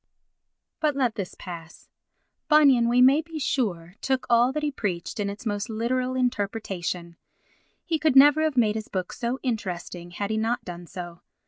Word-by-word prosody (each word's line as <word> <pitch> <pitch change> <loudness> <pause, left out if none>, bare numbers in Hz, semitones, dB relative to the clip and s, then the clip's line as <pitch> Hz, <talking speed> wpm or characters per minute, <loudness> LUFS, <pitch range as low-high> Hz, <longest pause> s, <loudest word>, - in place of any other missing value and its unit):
But 300 -3 +1
let 255 -5 +1
this 195 -4 -5
pass. 170 -2 -10 0.6
Bunyan, 275 -7 +5
we 250 +1 +5
may 275 +4 +6
be 325 0 -9
sure, 190 - -1
took 265 -1 0
all 240 +2 +5
that 305 +2 -3
he 295 - 0
preached 190 -7 -4
in 200 -1 0
its 205 +4 -8
most 205 +1 -2
literal 250 +3 -1
interpretation; 195 -8 -2 0.7
he 325 -3 0
could 310 -3 +2
never 290 +3 +7
have 310 -4 0
made 220 -3 +4
his 220 -1 -5
book 185 -2 -4
so 245 +1 -2
interesting 180 -7 -4
had 200 +4 -4
he 220 - 0
not 225 +2 -1
done 175 -1 -8
so. 175 -1 -8
230 Hz, 175 wpm, -25 LUFS, 185-265 Hz, 0.7 s, never